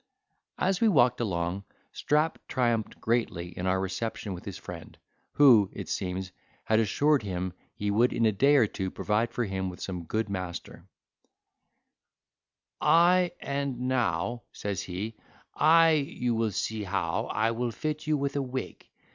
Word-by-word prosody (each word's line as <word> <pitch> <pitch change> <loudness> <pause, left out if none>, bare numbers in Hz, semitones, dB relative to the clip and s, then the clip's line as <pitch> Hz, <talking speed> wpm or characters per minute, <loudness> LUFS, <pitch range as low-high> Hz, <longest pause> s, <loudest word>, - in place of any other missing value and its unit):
As 190 +2 0
we 230 - +5
walked 125 - +4
along, 90 -2 -2 0.3
Strap 150 +2 0
triumphed 120 -4 0
greatly 110 -7 -1
in 90 - -3
our 95 0 +2
reception 95 +2 -3
with 90 - -9
his - - -6
friend, - - -10 0.4
who, 120 -9 +6
it - - -7
seems, 95 0 -3 0.3
had 110 0 +2
assured 145 +7 +2
him 90 -3 -3 0.2
he 105 0 -1
would 115 +4 +3
in 115 - +1
a 110 - +4
day 140 +9 +4
or 130 -6 +6
two 95 -2 -4
provide 105 +5 -1
for 120 - -1
him 95 -2 -3
with 90 - -10
some 90 -3 -5
good 110 +6 -1
master; 90 -3 -6 1.9
"I 175 +1 +4
and 140 -3 -3
now," 120 -3 0
says 100 -2 -4
he, 100 +5 -5 0.4
"I 165 +2 +5
you 140 -5 0
will 115 -1 +1
see 110 +2 -2
how 95 - -1
I 110 +2 0
will 120 +1 -1
fit 155 +6 -4
you 155 -1 +2
with 140 0 -2
a 140 - +1
wig. 130 0 -6
115 Hz, 155 wpm, -28 LUFS, 95-140 Hz, 1.9 s, who